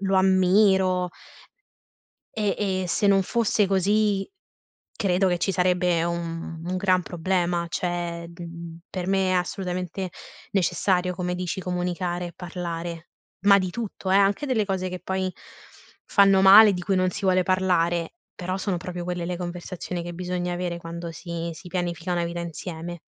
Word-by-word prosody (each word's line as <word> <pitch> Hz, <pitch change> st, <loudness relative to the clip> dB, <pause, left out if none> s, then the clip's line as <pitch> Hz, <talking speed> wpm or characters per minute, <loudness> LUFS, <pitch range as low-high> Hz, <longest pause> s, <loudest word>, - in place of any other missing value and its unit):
lo 195 Hz, -1 st, +1 dB
ammiro 190 Hz, -1 st, +4 dB, 1.3 s
e 200 Hz, -2 st, 0 dB
e -, -, -3 dB
se 205 Hz, -, +1 dB
non 195 Hz, -1 st, +5 dB
fosse 220 Hz, -1 st, +2 dB
così, 200 Hz, +1 st, +1 dB, 0.7 s
credo 190 Hz, -1 st, +2 dB
che 175 Hz, -, +1 dB
ci 195 Hz, -, 0 dB
sarebbe 180 Hz, -2 st, +2 dB
un 165 Hz, -1 st, -4 dB
un 180 Hz, +1 st, -2 dB
gran 185 Hz, -1 st, +3 dB
problema. 175 Hz, 0 st, -1 dB
Cioè, 170 Hz, -1 st, -3 dB
mhmm, 170 Hz, -1 st, -9 dB
per 185 Hz, -1 st, -4 dB
me 190 Hz, -1 st, +2 dB
è -, -, +2 dB
assolutamente 180 Hz, 0 st, -2 dB, 0.4 s
necessario, 180 Hz, 0 st, +1 dB
come 180 Hz, 0 st, -2 dB
dici, 180 Hz, +1 st, -3 dB
comunicare 180 Hz, 0 st, -2 dB
e 170 Hz, -, -11 dB
parlare 170 Hz, -1 st, -5 dB, 0.4 s
ma 200 Hz, -1 st, +8 dB
di 185 Hz, -, -1 dB
tutto, 200 Hz, -2 st, -5 dB
eh, -, -, +5 dB
anche 200 Hz, +7 st, +3 dB
delle 225 Hz, -5 st, +1 dB
cose 190 Hz, -2 st, -2 dB
che, 180 Hz, 0 st, -5 dB
poi, 190 Hz, 0 st, -2 dB, 0.7 s
fanno 195 Hz, -1 st, +5 dB
male, 200 Hz, +2 st, +9 dB
di 180 Hz, -, -3 dB
cui 195 Hz, +2 st, 0 dB
non 185 Hz, 0 st, +2 dB
si 205 Hz, -, -6 dB
vuole 185 Hz, -1 st, +3 dB
parlare, 175 Hz, -, +1 dB, 0.2 s
però, 185 Hz, +1 st, -3 dB
sono 195 Hz, -1 st, -1 dB
proprio 175 Hz, 0 st, -5 dB
quelle 175 Hz, -1 st, -3 dB
le 175 Hz, 0 st, -3 dB
conversazioni 175 Hz, 0 st, -5 dB
che 175 Hz, 0 st, -6 dB
bisogna 180 Hz, 0 st, -3 dB
avere 175 Hz, -1 st, -3 dB
quando 170 Hz, 0 st, -6 dB
si 170 Hz, +1 st, -5 dB
si 165 Hz, -, -12 dB
pianifica 175 Hz, -1 st, -2 dB
una 175 Hz, -1 st, 0 dB
vita 170 Hz, 0 st, -4 dB
insieme. 170 Hz, 0 st, -6 dB
180 Hz, 160 wpm, -25 LUFS, 175-190 Hz, 1.3 s, male